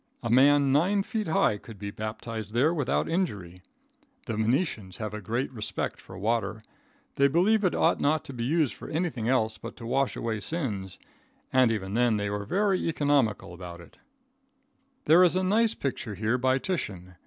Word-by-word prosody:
A 115 - -1
man 140 +2 +5
nine 185 +8 +3
feet 215 0 -3
high 160 - +2
could 110 0 -12
be 100 0 -5
baptized 110 0 -6
there 145 +7 +3
without 145 -7 0
injury. 105 - -2 0.6
The 115 - -3
Venetians 110 - -1
have 105 -2 -5
a 105 - -5
great 120 +8 -2
respect 110 -3 -4
for - - -11
water. 110 0 -1 0.5
They 140 - +5
believe 195 +9 +3
it 185 - +2
ought - - +2
not 155 +1 +1
to 135 - -8
be 120 -2 -4
used 150 +1 +1
for - - -10
anything 155 -8 -2
else 110 -4 +1
but 115 - -8
to 115 - -9
wash 135 +3 0
away 110 -2 -2
sins, 105 - -2 0.6
and 130 -3 +5
even 100 -3 -3
then 120 -1 +3
they 105 0 -2
are 105 0 -3
very 195 - +1
economical 145 - +1
about 85 -1 -9
it. 85 - -15 1.1
There 170 +4 +7
is 180 0 +4
a 185 - +1
nice 220 +4 +2
picture 115 -6 -4
here 110 +5 0
by 130 +1 +2
Titian. 100 - -4
120 Hz, 180 wpm, -27 LUFS, 105-155 Hz, 1.1 s, There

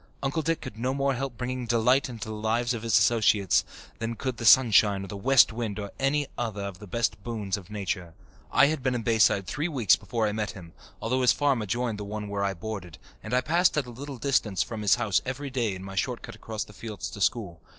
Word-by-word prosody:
Uncle 140 +4 0
Dick 165 +1 -1
could 110 - -8
no 130 +3 -1
more 140 0 +1
help 130 -1 -4
bringing 125 -1 -3
delight 125 +4 +3
into 115 -2 -7
the - - -4
lives 115 +3 0
of 115 - -4
his 115 -3 +3
associates 105 -2 +3 0.4
than 115 +1 -3
could 130 0 -3
the 115 - -5
sunshine 105 -4 +6
or - - -7
the 100 - -7
west 120 +3 +5
wind 110 -3 -3
or 100 -1 -5
any 145 +2 +1
other 110 -4 -3
of 100 -2 -6
the 105 - -10
best 115 0 -1
boons 105 -5 -2
of 100 -2 -10
nature. 95 -5 -4 0.4
I 130 - +6
had 150 -1 0
been 130 -1 0
in 120 - -2
Bayside 110 -4 +3
three 150 - -2
weeks 120 - +4
before 115 -2 -2
I - - 0
met 105 -1 -2
him, 85 -5 -12 0.3
although 130 +3 +1
his 125 - +5
farm 140 -5 +1
adjoined 115 +1 -2
the - - -4
one 105 0 -5
where 100 0 -2
I 100 -1 -1
boarded 95 -3 -6 0.2
and 110 - -8
I 125 +1 +3
passed 170 +5 +2
at 145 - +1
a 120 - -9
little 135 +3 -7
distance 110 -9 +1
from 110 +2 -6
his 105 - +4
house 110 -5 +1
every 135 +2 -5
day 115 -7 -1
in 95 - -8
my 95 0 -8
short 120 +5 -2
cut - - -8
across 110 -1 -5
the 105 - -15
fields 105 -2 -6
to 100 - -8
school. 95 -7 0
115 Hz, 245 wpm, -27 LUFS, 100-130 Hz, 0.4 s, sunshine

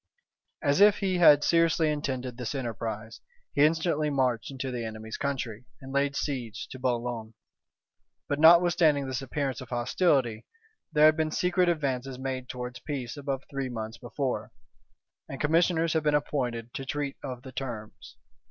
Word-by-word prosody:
As 145 +5 +3
if 205 0 +7
he 185 -3 0
had 145 -4 +7
seriously 165 -1 +3
intended 130 -4 -3
this 125 +2 -4
enterprise, 115 -3 -5 0.3
he 145 - +4
instantly 155 -1 +2
marched 130 -5 0
into 135 -1 -4
the 120 -2 -3
enemy's 110 0 -6
country, 125 -5 -3
and 135 0 -9
laid 140 0 +1
siege 125 -7 -3
to 130 - -8
Boulogne: 120 -3 -2 0.9
but 145 - -1
notwithstanding 165 -3 +6
this 130 0 -3
appearance 135 0 -3
of 130 - -10
hostility, 120 -2 +1 0.4
there 150 -1 +5
had 155 0 +7
been 160 -1 0
secret 180 +2 +2
advances 135 -5 -1
made 130 -1 -4
towards 125 0 -6
peace 130 -4 -5
above 140 -2 -3
three 135 -2 -3
months 115 -1 -6
before; 120 -3 -3 0.8
and 135 - -6
commissioners 165 +1 +2
had 160 - +2
been 150 -1 +2
appointed 120 -5 -2
to 135 - -4
treat 140 +1 -3
of 125 -1 -6
the 130 - -9
terms. 120 -3 -7
135 Hz, 155 wpm, -28 LUFS, 120-150 Hz, 0.9 s, if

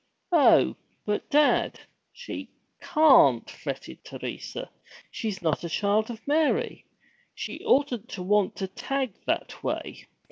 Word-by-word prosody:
'Oh, 325 -5 +5 0.3
but, 210 0 -2
dad, 295 0 +3 0.3
she 485 - -8 0.3
can't!' 260 - +5
fretted 65 - -7
Teresa. - - -7 0.4
'She's 200 -5 -4
not 160 -1 0
a 170 - -4
Child 205 +5 +1
of 230 0 -9
Mary! 320 +11 +1 0.5
She - - -6
oughtn't 260 -5 +1
to 185 - -6
want 205 +1 +2
to 190 - -3
tag 260 +4 -3
that - - -2
way. - - -4
220 Hz, 120 wpm, -26 LUFS, 190-285 Hz, 0.5 s, Oh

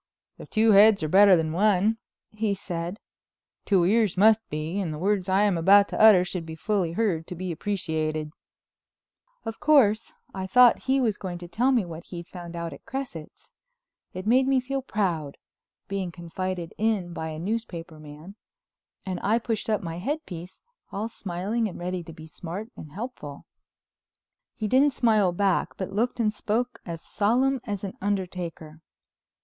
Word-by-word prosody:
"If - - -11
two 220 +1 +4
heads 205 -2 +6
are - - 0
better 195 +3 +7
than 160 -2 0
one," 205 +4 +2 0.3
he 215 -1 -1
said, 175 +1 -5 0.7
"two 190 -4 +3
ears 205 0 +2
must 220 +3 +6
be; 155 +5 -3
and 180 -5 -2
the 150 - -5
words 195 +2 0
I 190 +2 +3
am 200 -5 +2
about 200 +4 +6
to - - -2
utter 205 -5 +8
should 180 -2 -4
be 160 0 -8
fully 185 -1 -1
heard 175 -6 0
to 180 - -6
be 185 +1 -4
appreciated." 155 -4 -2 1.1
Of 225 0 -5
course 230 -8 +4 0.2
I 190 -1 -4
thought 245 +4 +6
he 270 +1 +2
was 225 -6 +1
going 180 -3 -5
to 175 0 -9
tell 245 +9 +1
me 240 -7 +2
what 170 -1 -9
he'd 170 -1 -8
found 175 -1 -9
out 170 -2 -4
at - - -13
Cresset's. 260 - -7 0.6
It 185 +1 -7
made 255 +4 +4
me 270 -1 +3
feel 270 +2 -3
proud, 175 - -2 0.5
being 195 -3 -3
confided 175 0 -5
in 205 -6 0
by 160 - -4
a 155 -1 -6
newspaper 170 -4 -4
man, 155 +5 -11 0.7
and 185 -2 -3
I 215 +3 +2
pushed 225 -2 -3
up 210 -2 0
my 165 0 -5
headpiece, 185 - -5 0.3
all 210 +3 -3
smiling 205 +4 -2
and 190 - -8
ready 180 +1 -3
to 165 - -9
be 155 0 -11
smart 180 +8 -7
and 155 - -10
helpful. 185 - -7 1.1
He 215 - -3
didn't 270 +5 +4
smile 215 -6 +3
back 190 +1 0
but 190 0 -5
looked 240 +4 -1
and 215 -2 +1
spoke 240 +4 -2
as 165 -1 -6
solemn 255 +5 +1
as 205 -3 -4
an 195 - -4
undertaker. 180 -5 -4
195 Hz, 170 wpm, -26 LUFS, 170-220 Hz, 1.1 s, utter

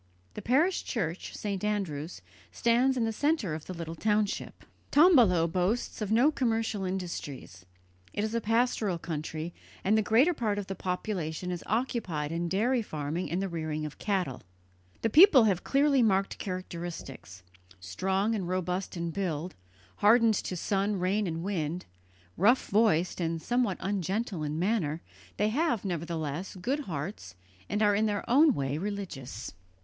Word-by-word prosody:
The - - -6
parish 305 - +2
church, 180 -6 -3
St. 200 -2 -3
Andrew's, 175 - -3 0.3
stands 245 +3 +2
in 240 - +1
the 225 - -1
centre 285 - 0
of 155 0 -6
the 185 - -5
little 165 -1 -5
township. 210 +3 -1 0.2
Tombolo 245 - +6
boasts 185 +8 -1
of 210 -1 -2
no 245 +7 +5
commercial 225 -7 -1
industries; 160 - -5 0.4
it 205 - -2
is 220 +1 -2
a 230 - 0
pastoral 225 -4 +1
country, 160 0 -5 0.3
and 205 +3 +3
the 220 - +4
greater 245 +11 +4
part 215 -8 -1
of 205 - -3
the 195 - -4
population 180 -2 -3
is 175 - -4
occupied 200 - -1
in 170 +1 -2
dairy 235 +7 +2
farming 155 -2 -4
and 180 +3 -1
the - - -1
rearing 155 -3 -3
of 150 - -8
cattle. 185 - -1 0.6
The 225 - +1
people 315 - +8
have 195 -5 +1
clearly 280 -1 +3
marked 195 -3 +1
characteristics; 170 - -6 0.4
strong 190 - -1
and 195 -5 -2
robust 185 0 -2
in 170 0 -2
build, 175 -2 -3 0.4
hardened 225 +2 +5
to 185 -2 -3
sun, 200 +3 0
rain, 190 +3 0
and 165 0 -3
wind, 175 -3 -2 0.5
rough 225 +9 +3
voiced 195 -5 +2
and 165 0 -1
somewhat 240 0 0
ungentle 195 0 -2
in 150 0 -2
manner, 170 -4 0 0.3
they 210 - +2
have, 260 - 0
nevertheless, 170 0 -3
good 250 +11 -1
hearts 145 - -5 0.3
and 210 +1 +1
are 205 -1 +4
in 215 +2 +2
their 205 -1 -2
own 285 +3 +5
way 140 +2 -2
religious. 175 - -5
195 Hz, 155 wpm, -29 LUFS, 165-220 Hz, 0.6 s, people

